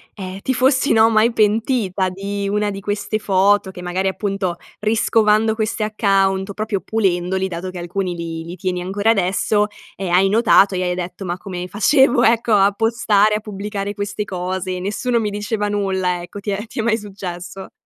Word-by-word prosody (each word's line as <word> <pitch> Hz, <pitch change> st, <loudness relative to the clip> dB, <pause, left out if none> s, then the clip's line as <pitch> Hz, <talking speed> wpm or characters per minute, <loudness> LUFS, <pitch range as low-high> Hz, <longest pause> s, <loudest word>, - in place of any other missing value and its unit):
ehm, 190 Hz, -1 st, -7 dB
ti 260 Hz, -, -2 dB
fossi 265 Hz, +2 st, +2 dB
no 225 Hz, 0 st, +5 dB
mai 220 Hz, +2 st, +4 dB
pentita 215 Hz, -3 st, +1 dB
di 200 Hz, +1 st, -4 dB
una 210 Hz, 0 st, 0 dB
di 195 Hz, -, -6 dB
queste 205 Hz, +2 st, -2 dB
foto 200 Hz, 0 st, +2 dB
che, 185 Hz, -1 st, -9 dB
magari 180 Hz, +2 st, -1 dB
appunto, 195 Hz, -2 st, -2 dB, 0.2 s
riscovando 215 Hz, 0 st, +2 dB
questi 220 Hz, 0 st, -2 dB
account, 195 Hz, -2 st, +1 dB
proprio 215 Hz, -2 st, -2 dB
pulendoli, 190 Hz, -3 st, 0 dB
dato 180 Hz, 0 st, -5 dB
che 185 Hz, -, -8 dB
alcuni 180 Hz, +1 st, -3 dB
li 170 Hz, -1 st, -5 dB
li 170 Hz, +2 st, -8 dB
tieni 180 Hz, 0 st, -3 dB
ancora 200 Hz, +4 st, +1 dB
adesso, 205 Hz, +1 st, +1 dB, 0.3 s
ehm, 190 Hz, -3 st, -4 dB
hai 185 Hz, +2 st, +4 dB
notato 205 Hz, -2 st, +4 dB
e 185 Hz, -, -1 dB
hai 180 Hz, 0 st, -1 dB
detto: 180 Hz, +2 st, -6 dB
"Ma 175 Hz, 0 st, -3 dB
come 180 Hz, -1 st, -6 dB
facevo" 240 Hz, +4 st, +3 dB
ecco 230 Hz, 0 st, +3 dB
"a 200 Hz, -1 st, +5 dB
postare 215 Hz, -1 st, +2 dB
a -, -, -1 dB
pubblicare 205 Hz, -1 st, -5 dB
queste 205 Hz, +1 st, -3 dB
cose? 185 Hz, 0 st, -3 dB
Nessuno 215 Hz, +6 st, -1 dB
mi 215 Hz, -2 st, -1 dB
diceva 210 Hz, +1 st, -2 dB
nulla?" 190 Hz, -3 st, -1 dB
Ecco 175 Hz, +3 st, -9 dB
ti 205 Hz, +1 st, -6 dB
è 205 Hz, +2 st, -3 dB
ti 230 Hz, -, -8 dB
è -, -, +3 dB
mai 225 Hz, -1 st, +2 dB
successo? 190 Hz, -3 st, -8 dB
200 Hz, 180 wpm, -19 LUFS, 185-215 Hz, 0.3 s, no